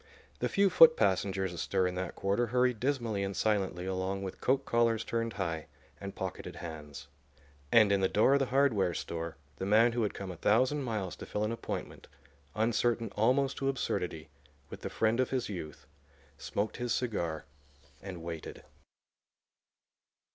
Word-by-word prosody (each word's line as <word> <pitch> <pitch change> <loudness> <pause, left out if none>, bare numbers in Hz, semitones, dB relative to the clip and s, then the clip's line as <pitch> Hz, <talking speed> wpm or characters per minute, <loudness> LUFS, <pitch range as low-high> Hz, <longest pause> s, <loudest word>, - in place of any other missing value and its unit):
The - - 0
few 200 -2 +3
foot 160 -1 +8
passengers 95 -2 +1
astir 95 +2 0
in 90 - -1
that 90 +1 -4
quarter 100 +5 0
hurried 125 -1 +2
dismally 120 -6 -1
and 100 0 -3
silently 95 -4 0
along 95 +1 -2
with 95 - -6
coat 135 +1 +2
collars 115 -1 +2
turned 115 -1 -2
high 85 -5 -3 0.3
and 100 0 -7
pocketed - - -5
hands. 75 -3 -8 0.6
And 110 -3 +6
in 100 - +3
the 95 - +2
door 110 +6 +4
of 140 - +4
the 135 - +1
hardware 120 -10 +2
store 85 -2 -4 0.2
the 95 - -3
man 115 +4 +5
who 120 0 -1
had 105 - -1
come 95 -2 -5
a 90 - -9
thousand 130 - +2
miles 110 -8 -3
to - - -9
fill 105 - -2
an 105 - 0
appointment, 115 - -6 0.5
uncertain 115 +1 +1
almost 130 +5 +2
to 135 - 0
absurdity, 85 - -2 0.4
with - - -8
the - - -4
friend 110 +2 +1
of 130 - +2
his 130 -4 -1
youth, 80 -7 -7 0.5
smoked 105 +1 -3
his 120 -1 -3
cigar 85 -11 -2 0.6
and 90 -4 -7
waited. 85 -2 -7
105 Hz, 165 wpm, -31 LUFS, 95-120 Hz, 0.6 s, foot